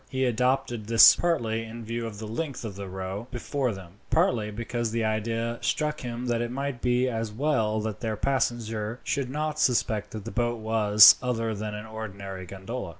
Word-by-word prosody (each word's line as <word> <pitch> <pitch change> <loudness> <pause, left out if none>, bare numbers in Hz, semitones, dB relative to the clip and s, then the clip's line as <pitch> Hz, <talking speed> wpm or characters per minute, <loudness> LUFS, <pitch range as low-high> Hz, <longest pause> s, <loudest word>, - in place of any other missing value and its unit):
He 130 -1 0
adopted 125 -2 0
this 115 0 +9
partly 115 -10 0
in 115 0 -8
view 115 +1 -3
of 105 -2 -8
the 110 +1 -6
length 130 +2 -4
of 105 -4 -6
the 100 0 -6
row 95 +4 -5
before 130 +1 -2
them, 95 -2 -10
partly 110 -3 +2
because 115 +2 -3
the 115 +1 -1
idea 115 +2 -1
struck 150 0 -1
him 120 0 -5
that 120 -1 0
it 120 - -2
might 135 -1 -4
be 125 +1 +2
as 115 -3 -3
well 110 -4 0
that 110 -2 -4
their 110 -3 -3
passenger 115 -3 -1
should 140 -3 -2
not 150 +2 -3
suspect 110 -4 +1
that 110 -2 -8
the 115 - -5
boat 120 0 0
was 110 -1 +7
other 115 -3 -1
than 105 0 -5
an 105 +1 -7
ordinary 100 -4 -7
gondola. 100 +3 -6
115 Hz, 190 wpm, -27 LUFS, 105-125 Hz, -, this